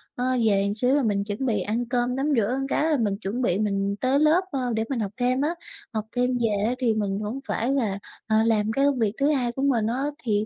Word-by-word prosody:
Ơ, 250 - -2 0.2
về 200 -1 +2
một 200 - -1
xíu 250 +5 +2
là 290 - +2
mình 200 -2 +1
chuẩn 205 +5 -4
bị 220 -5 +1
ăn 225 +5 -1
cơm, 245 0 0
tắm 270 +1 -1
rửa 230 +4 +1
cái 310 +3 +1
là 300 - +3
mình 205 -5 0
chuẩn 215 +6 -3
bị 195 -6 +1
mình 200 -1 0
tới 265 +2 +2
lớp, 310 +4 +4
ơ, 250 -3 -1
để 220 0 0
mình 265 -4 -1
học 205 -3 -2
thêm 255 +1 +1
á. 320 +4 0 0.4
Học 215 -1 -2
thêm 250 0 +1
về 210 -4 0
á 250 - -1
thì 235 -3 +2
mình 205 -2 -1
hổng 215 +5 -4
phải 245 +4 0
là 215 -8 0 0.3
ờ, 220 0 +3
làm 220 -1 +2
cái 275 +5 +2
công 280 -3 +1
việc 215 -3 +1
thứ 280 +1 +2
hai 250 -5 0
của 265 - -5
mình 240 -6 +2
á, 250 +4 -1 0.2
thì 210 -2 +1
235 Hz, 265 wpm, -25 LUFS, 210-260 Hz, 0.4 s, lớp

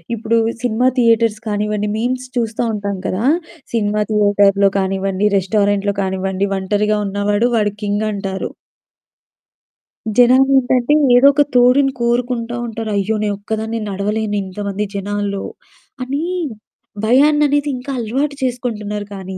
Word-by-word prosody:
ఇప్పుడు 230 +1 0 0.2
cinema 245 +2 +2
theatres 230 -2 +3
కానివ్వండి, 210 0 -1
memes 255 +2 -2
చూస్తా 230 0 -1
ఉంటాం 200 -2 -3
కదా! 190 +5 -2 0.5
సినిమా 210 -1 +1
థియేటర్‌లో 205 -1 +3
కానివ్వండి, 195 +1 0
రెస్టారెంట్‌లో 200 +1 +1
కానివ్వండి, 190 +1 -1
ఒంటరిగా 210 +2 0
ఉన్నవాడు 205 +3 0
వాడు 210 -2 +1
కింగంటారు. 205 -2 -2 1.7
జనాలేంటంటే 260 +1 +4 0.2
ఏదో 265 +3 +7
ఒక 290 +1 +4
తోడుని 255 +3 +5
కోరుకుంటా 240 0 -1
ఉంటారు. 225 0 -5
అయ్యో! 210 +3 0
నేనొక్కదాన్నే 220 +2 -3
నడవలేను 210 +2 -2
ఇంతమంది 200 +2 -4
జనాల్లో! 200 0 -3 0.6
అని 275 +5 -3 0.8
భయాన్ననేది 290 +3 +3
ఇంకా 255 +3 -6
అలవాటు 270 +6 -2
చేసుకుంటున్నారు 215 -5 -3
కానీ 190 -1 -7
215 Hz, 105 wpm, -18 LUFS, 200-245 Hz, 1.7 s, ఏదో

